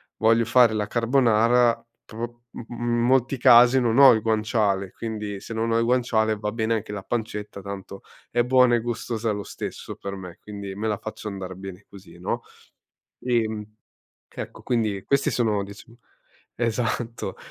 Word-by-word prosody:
voglio 115 +1 +3
fare 120 -1 +5
la 105 -1 -1
carbonara, 120 -1 +3 0.2
però 110 - -14
u 120 0 -6
uhm, 120 - -7 0.2
in 120 0 +1
molti 130 +2 +2
casi 125 +1 +7
non 120 +1 +1
ho 135 -3 +10
il 110 - 0
guanciale, 105 -3 0
quindi 105 -3 -5
se 115 - -7
non 115 +1 -1
ho 115 - +3
il 115 - +2
guanciale, 115 -3 +1
va 105 0 -3
bene 115 0 0
anche 105 -1 -4
la 100 -2 -6
pancetta, 105 -3 -4
tanto 100 0 -8 0.3
è 120 0 +2
buona 125 -1 +4
e - - +2
gustosa 115 -1 -2
lo 100 -1 -3
stesso - - -7
per 100 0 -6
me, 90 -2 -9
quindi 100 -2 -7
me 110 +2 -3
la 105 -2 0
faccio 110 0 -7
andar 95 -2 -6
bene 95 +1 -9
così, 95 -4 -14
no? 90 - -3 0.8
Ehm. 110 -4 0 0.7
Che - - -5
ecco, - - -11
quindi, 110 -5 -1
questi 140 0 +2
sono 110 -4 +1
diciamo 105 +4 -13 0.6
esatto, 115 0 -2
110 Hz, 170 wpm, -24 LUFS, 105-120 Hz, 0.8 s, ho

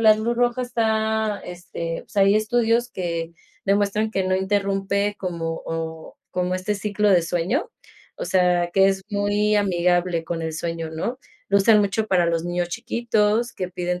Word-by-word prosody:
La 220 -1 +7
luz 225 +2 -1
roja 245 +1 +1
está 220 -3 0
este, 175 -2 -5
o - - -27
sea, 200 - +2
hay 200 +2 +5
estudios 230 +2 +1
que 170 -2 -3 0.3
demuestran 205 +2 +1
que 190 -3 -1
no 185 0 +1
interrumpe 200 +1 0
como, 165 -3 -3
o 160 0 -5
como 180 0 -1
este 185 +3 -1
ciclo 210 0 0
de 180 -2 +6
sueño, 185 - -1 0.5
o - - -4
sea, 180 -2 +2
que 195 +1 +4
es 195 0 -1
muy 205 +1 +1
amigable 175 -3 +1
con 165 0 -3
el 160 -1 -3
sueño, 165 0 -3
¿no?, 200 +11 -3 0.3
lo 200 - +4
usan 210 +1 +5
mucho 205 +2 0
para 180 -4 +3
los 165 0 0
niños 175 0 -1
chiquitos 230 +1 0
que 185 - -4
piden 180 0 -3
195 Hz, 170 wpm, -23 LUFS, 175-215 Hz, 0.5 s, La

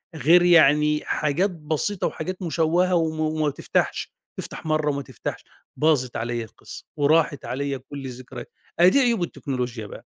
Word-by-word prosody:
غير 160 +5 +5
يعني 150 -3 +5
حاجات 155 +7 0
بسيطة 165 +4 -2
وحاجات 185 +1 -5
مشوّهة 175 +2 +1
وما 160 -2 0
وما 155 -1 0
تفتحش، 140 - -2 0.2
تفتح - - -7
مرّه 155 -1 +1
وما 140 0 -3
تفتحش، 130 -5 -7 0.3
باظت 145 -5 +1
عليَّ 120 +1 -2
القصّة 110 - -12
وراحت 150 0 +2
عليَّ 140 +1 -3
كُلّ 140 +1 -9
الذكريات، 125 -1 -9 0.3
أهي 175 +1 +8
دي 280 - +3
عيوب 235 -8 +2
التكنولوجيا 125 -8 -4
بقى، - - -11
150 Hz, 145 wpm, -24 LUFS, 135-165 Hz, 0.3 s, أهي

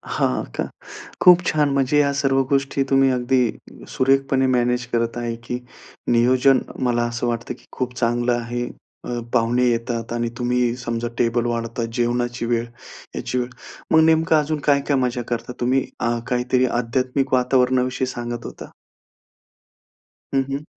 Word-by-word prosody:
हां 65 - +1
का? - - 0 0.6
खूप 180 -1 +8
छान. 150 -2 +2
म्हणजे 140 +2 +2
या 140 -1 +3
सर्व 135 -1 +2
गोष्टी 140 0 +1
तुम्ही 135 0 +4
अगदी 125 -1 +1 0.4
सुरेखपणे 135 0 +2
मॅनेज 125 -1 +1
करत 115 0 0
आहे, 120 -1 -3
की 120 +1 -5 0.5
नियोजन 125 +3 +4 0.3
मला 120 -1 +1
असं 120 +1 -3
वाटतं, 115 0 -3
की 125 - -18
खूप 125 -1 -3
चांगलं 120 +1 +1
आहे. 120 +1 -2 0.4
अ, 120 0 -3
पाहुणे 120 +1 +2
येतात 115 0 -2
आणि 120 0 -1
तुम्ही 125 -1 +1
समजा 120 -1 -3
टेबल 120 0 +1
वाढतात, 115 0 -2
जेवणाची 120 0 -1
वेळ, 115 0 0 0.5
याची 125 - -3
वेळ. 125 -1 0 0.4
मग 160 - +6
नेमकं 160 0 +3
अजून 150 +1 -1
काय-काय 140 0 +2
मजा 125 -1 0
करता 120 +1 -3
तुम्ही? 130 +2 +1
अ, 120 0 0
काहीतरी 125 0 +1 0.2
आध्यात्मिक 130 +3 -1
वातावरणाविषयी 130 0 +2
सांगत 120 -1 -5
होता. - - -9 1.6
हं, 135 0 +3
हं. 140 +2 -3
125 Hz, 145 wpm, -22 LUFS, 120-135 Hz, 1.6 s, खूप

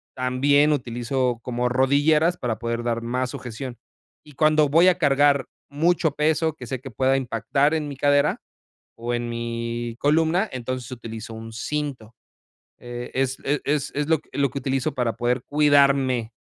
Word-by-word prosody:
también 140 +4 +3
utilizo 125 -1 -1
como 125 0 -1
rodilleras 145 +6 +3
para 120 -6 -2
poder 115 0 -3
dar 115 -1 -1
más 125 +2 -2
sujeción. 125 +1 -7 0.5
Y 150 - -14
cuando 155 +1 +3
voy 165 +5 +5
a 180 -1 +4
cargar 140 -3 +3 0.2
mucho 160 +2 +1
peso, 155 +2 +1
que 125 -5 -10
sé 130 0 -4
que 135 +2 -9
pueda 130 +4 +2
impactar 135 +4 0
en 155 -2 -1
mi 140 - -8
cadera, 145 +1 +2 0.6
o 120 +1 -4
en 120 0 -2
mi 115 0 -4
columna, 160 - +2
entonces, 130 -1 -4
utilizo 115 -2 -7
un 115 0 -9
cinto. 130 -2 -4 0.6
E 120 0 -7
es 130 0 0
e 145 +1 0
es 145 -1 -1
es 145 0 -1
lo 160 -2 +3
que - - -28
lo 140 -1 +2
que 140 - -5
utilizo 135 -1 -1
para 125 -4 -1
poder 120 +1 -1
cuidarme, 140 -5 +3
130 Hz, 165 wpm, -23 LUFS, 120-145 Hz, 0.6 s, voy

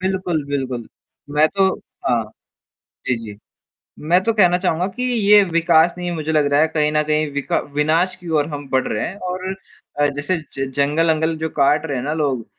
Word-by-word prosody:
बिल्कुल, 185 -5 -1
बिल्कुल। 130 -5 -3 0.4
मैं 150 +2 +3
तो 195 -1 +4 0.4
हाँ, 115 -2 +1 0.8
जी, 125 - +1
जी। 105 -2 -9 0.7
मैं 180 +2 +5
तो 230 - +1
कहना 180 -5 +4
चाहूँगा 180 -1 0
कि 250 - -3
ये 210 -4 +5
विकास 170 -1 +3
नहीं 180 0 -4
है - - -3
मुझे 155 -1 -3
लग 155 -2 +3
रहा 145 - +4
है 160 - +4
कहीं 150 -1 0
न 150 0 +2
कहीं 155 0 0
विका 145 0 -1 0.2
विनाश 160 +5 +2
की 175 - -11
ओर 145 - 0
हम 145 -2 -6
बढ़ 130 -1 +1
रहे 105 - -2
हैं 185 - -7 0.2
और 185 +1 -4 0.5
अ, 145 - +4
ज - - -2
जैसे 145 +6 -1 0.3
जंगल-अंगल 160 +3 +1
जो 160 0 -3
काट 150 +2 +2
रहे 140 -4 -3
हैं 125 - -3
ना 150 +2 -2
लोग 140 -7 -1
155 Hz, 200 wpm, -20 LUFS, 145-180 Hz, 0.8 s, मैं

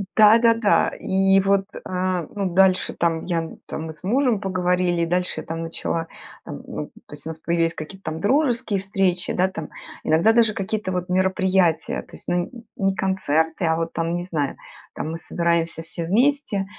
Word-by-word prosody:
Да-да-да, 225 0 +5
и 195 0 +3
вот, 195 0 +2
э, 185 -2 -2
ну, 195 -4 -2
дальше 190 0 +3
там 165 -1 0
я 165 -2 -1 0.2
там 160 - -5
мы 160 - -6
с 155 - -17
мужем 245 +1 +2
поговорили, 180 -3 +1
дальше 180 +2 -1
там 165 +1 -5
начала 165 0 -3 0.4
там, - - -8
то - - -6 0.2
есть, - - -9
у - - -4
нас 160 0 -7
появились 165 0 0
какие-то 190 +5 -9
там 160 +1 -5
дружеские 240 -3 +1
встречи, 190 -2 0
да, 185 +1 +2
там, 160 -5 -7 0.3
иногда 165 +8 +4
даже 225 -2 +4
какие-то 200 0 -2
вот 180 0 -3
мероприятия, 185 -2 +2
то - - -15
есть, - - -16
ну, 175 0 0 0.3
не 195 -1 +1
концерты, 165 -4 0
а 160 - +2
вот 165 0 -2
там, 165 +1 -1
не 175 - -2
знаю, 155 -6 -2 0.4
там 155 - -4
мы 165 - -4
собираемся 170 -1 0
все 165 0 -5
вместе. 235 - +1
180 Hz, 170 wpm, -23 LUFS, 165-195 Hz, 0.4 s, Да-да-да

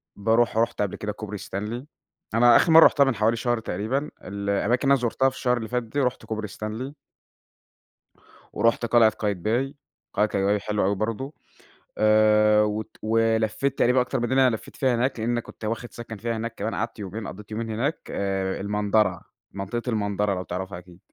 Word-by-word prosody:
باروح 115 +2 +2
رُحت 115 -2 +1
قبل 100 - -1
كده 105 0 -4
كوبري 105 0 -6
ستانلي. 105 +7 -5 0.5
أنا 120 +1 +6
آخر 165 - +5
مرّة 160 0 +9
رُحتها 140 - +5
من 135 -4 +1
حوالي 110 +3 +2
شهر 120 0 0
تقريبًا، 130 +7 -2
الأماكن 100 +4 -1
اللي 140 - +6
أنا 135 - +2
زُرْتها 130 +3 +2
في 130 - -13
الشهر 125 -1 +1
اللي 110 -2 -4
فات 125 -1 -1
ده، 135 +5 -2
رُحْت 125 0 -2
كوبري 110 -1 -4
ستانلي. 110 +7 -6 1.6
ورُحْت 115 +1 +2
قلعة 115 -1 +5
قايتباي، 110 +7 -2 0.4
قلعة 105 - +2
قايتباي 100 0 +1
حلوة 105 -1 -1
أوي 100 +1 +1
برضو. 115 +8 -3 0.6
آآ، 105 0 +5
وت 105 0 -3
ولفِّيت 115 +4 +1
تقريبًا 125 +1 +4
أكتر 125 - -1
من 120 - -1
اللي 135 0 +5
أنا 115 - 0
لفِّيت - - -14
فيها 130 -3 +2
هناك، 120 0 0
لأن 120 +1 0
كنت 110 - -12
واخد 115 +2 -4
سكن 115 -1 -8
فيها 115 +2 -3
هناك 115 +1 -4
كمان 110 +3 -3
قعدت 110 +1 -3
يومين، 105 +1 -6
قَضِّيت 105 +3 -10
يومين 110 +1 -4
هناك. 135 +9 -1
آآ، 95 -1 -2
المندَرَة، 105 -2 +1 0.3
منطقة 100 +5 -4
المندَرَة 100 -2 0
لو 90 - -3
تعرفها 95 +1 -5
أكيد. 90 0 -15
110 Hz, 180 wpm, -25 LUFS, 105-120 Hz, 1.6 s, مرّة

